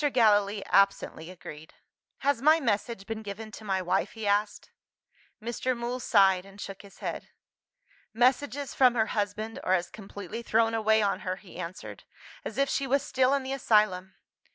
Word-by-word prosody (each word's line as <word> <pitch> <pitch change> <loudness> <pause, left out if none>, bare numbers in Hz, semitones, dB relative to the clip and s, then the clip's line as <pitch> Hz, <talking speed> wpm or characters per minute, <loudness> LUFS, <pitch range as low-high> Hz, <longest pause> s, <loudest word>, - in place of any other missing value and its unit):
Gallilee 205 -4 +3
absently 195 -4 +2
agreed. 160 -4 -11 0.5
"Has 280 -4 +1
my 310 +3 +6
message 215 -5 -1
been 220 0 -5
given 215 +1 -7
to 220 - -10
my 190 -3 -1
wife?" 180 +2 0
he 220 -2 -6
asked. 205 +1 0 0.7
Mr. 240 +2 -2
Mool 240 +2 -3
sighed 195 -6 +4
and 195 +1 -15
shook 195 -1 -7
his 200 -1 -16
head. - - -4 0.8
"Messages 265 +4 +1
from 250 -2 +4
her 220 -2 +3
husband 215 +2 -2
are 185 - +3
as 175 -1 -2
completely 205 +1 -8
thrown 225 0 +2
away 220 -1 +3
on 200 - 0
her," 185 0 -3
he 185 -2 -14
answered, 180 +1 -7 0.4
"as - - -6
if 275 0 +3
she 275 0 -1
was 275 +2 +2
still 265 -1 +2
in 275 - -2
the 265 +1 -3
asylum. 210 -7 +2
215 Hz, 170 wpm, -28 LUFS, 195-240 Hz, 0.8 s, my